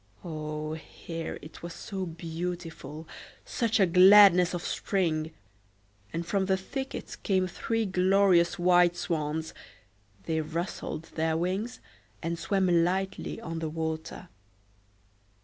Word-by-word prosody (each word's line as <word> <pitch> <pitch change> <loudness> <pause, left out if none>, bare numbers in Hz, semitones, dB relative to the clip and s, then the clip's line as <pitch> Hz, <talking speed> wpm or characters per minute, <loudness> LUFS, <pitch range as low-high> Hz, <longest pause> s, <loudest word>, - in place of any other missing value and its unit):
O, 155 -1 -4
here 165 +1 -6
it 155 0 -11
was 170 0 -7
so 190 -3 -5
beautiful, 165 -2 -6 0.4
such 230 -1 0
a 195 - +6
gladness 180 0 +7
of 175 - -5
spring! 160 -5 0 0.8
and 170 +1 -3
from 190 +2 0
the 190 -1 +2
thicket 265 +8 -6
came 190 -2 +2
three 225 +5 -2
glorious 185 -2 +3
white 175 0 +4
swans; 160 -2 -2 0.7
they 160 -1 -1
rustled 165 0 -4
their 160 0 0
wings, 190 +8 -2 0.4
and 165 0 -2
swam 185 -4 +2
lightly 190 +4 -2
on 165 -7 -5
the 160 -1 -3
water. 160 +2 -4
175 Hz, 115 wpm, -28 LUFS, 160-190 Hz, 0.8 s, gladness